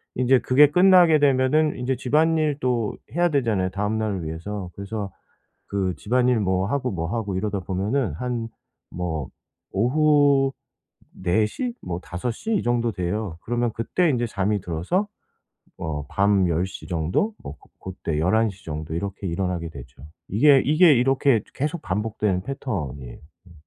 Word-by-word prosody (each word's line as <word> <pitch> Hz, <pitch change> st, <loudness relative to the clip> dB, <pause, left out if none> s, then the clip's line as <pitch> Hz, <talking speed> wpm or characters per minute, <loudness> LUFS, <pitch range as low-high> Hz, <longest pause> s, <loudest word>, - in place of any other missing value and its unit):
인제 130 Hz, +1 st, +4 dB
그게 140 Hz, +5 st, +5 dB
끝나게 180 Hz, -2 st, +6 dB
되면은 145 Hz, +2 st, +2 dB
인제 125 Hz, +1 st, -1 dB
집안일도 145 Hz, -6 st, +1 dB, 0.2 s
해야 175 Hz, 0 st, +3 dB
되잖아요 115 Hz, -, +1 dB
다음 105 Hz, +3 st, -2 dB
날을 100 Hz, -6 st, -2 dB
위해서. 90 Hz, +4 st, -5 dB
그래서 100 Hz, 0 st, -5 dB, 0.6 s
그 95 Hz, -2 st, -1 dB
집안일 125 Hz, +4 st, +1 dB
뭐 95 Hz, -1 st, +1 dB
하고, 130 Hz, +3 st, -1 dB
뭐 85 Hz, -3 st, -3 dB
하고 105 Hz, -5 st, -2 dB
이러다 100 Hz, 0 st, -2 dB
보면은 100 Hz, -, -1 dB
한 120 Hz, +4 st, -3 dB, 0.4 s
뭐 80 Hz, -6 st, -4 dB, 0.4 s
오후 140 Hz, +3 st, +3 dB, 0.7 s
4 95 Hz, +4 st, +2 dB
시? 245 Hz, -, -4 dB
뭐 90 Hz, -1 st, -4 dB
5 90 Hz, +7 st, -4 dB
시 220 Hz, -, -5 dB
이 -, -, 0 dB
정도 120 Hz, -1 st, +1 dB
돼요. 90 Hz, -1 st, -3 dB
그러면 120 Hz, 0 st, -1 dB
그때 165 Hz, +10 st, 0 dB
인제 120 Hz, -3 st, 0 dB
잠이 100 Hz, -1 st, -1 dB
들어서 90 Hz, -, -1 dB, 0.7 s
뭐 75 Hz, -3 st, -4 dB
밤 100 Hz, -2 st, +2 dB
10 85 Hz, +2 st, 0 dB
시 95 Hz, -, -9 dB
정도 90 Hz, -, 0 dB
뭐 70 Hz, -, -6 dB
고 -, -, -24 dB
고때 85 Hz, -5 st, -4 dB
11 110 Hz, +7 st, +2 dB
시 95 Hz, 0 st, -16 dB
정도 80 Hz, 0 st, -5 dB
이렇게 100 Hz, +3 st, -4 dB
일어나게 85 Hz, -1 st, -2 dB
되죠. 65 Hz, -2 st, -12 dB, 0.2 s
이게, 135 Hz, +7 st, +5 dB
이게 155 Hz, +3 st, +6 dB
이렇게 135 Hz, 0 st, +3 dB
이제 105 Hz, -, -12 dB
계속 150 Hz, +4 st, -3 dB
반복되는 105 Hz, -1 st, -1 dB
패턴이에요. 75 Hz, -, -5 dB, 0.3 s
음. -, -, -16 dB
105 Hz, 290 characters per minute, -23 LUFS, 90-135 Hz, 0.7 s, 끝나게